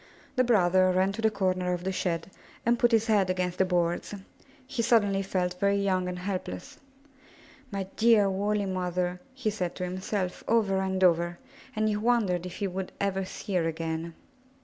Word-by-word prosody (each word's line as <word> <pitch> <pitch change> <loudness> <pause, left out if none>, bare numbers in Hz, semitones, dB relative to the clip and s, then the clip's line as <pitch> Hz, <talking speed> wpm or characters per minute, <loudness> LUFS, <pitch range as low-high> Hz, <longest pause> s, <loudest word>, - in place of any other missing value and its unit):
The 255 - +4
brother 185 -5 +4
ran 185 +1 +2
to 215 +3 -5
the 220 - +4
corner 185 -3 0
of 175 0 -4
the 190 - -1
shed 180 0 -2 0.3
and 235 +1 +3
put 240 - +4
his 225 -1 +3
head 205 -5 +3
against 180 0 -1
the 190 - +5
boards. 175 +2 0 0.5
He 270 -2 -2
suddenly 205 -4 +3
felt 180 -2 -2
very 200 +1 +3
young 190 -2 +1
and 180 - -4
helpless. 180 - -5 0.9
My 200 -4 -3
dear, 220 -3 +5
woolly 205 +2 0
mother 180 -1 -1
r' 180 +1 -7 0.2
he 250 -5 -1
said 180 -4 -3
to 185 - -4
himself, 185 +1 -3
over 210 -4 +2
and 190 0 -1
over, 175 -1 +3 0.4
and 215 0 +1
he 210 -1 +1
wondered 210 -6 +1
if 180 - -8
he 205 - -2
would 190 0 -4
ever 195 -1 0
see 200 +2 -7
her 170 -3 +2
again. 165 0 -3
190 Hz, 185 wpm, -28 LUFS, 180-210 Hz, 0.9 s, the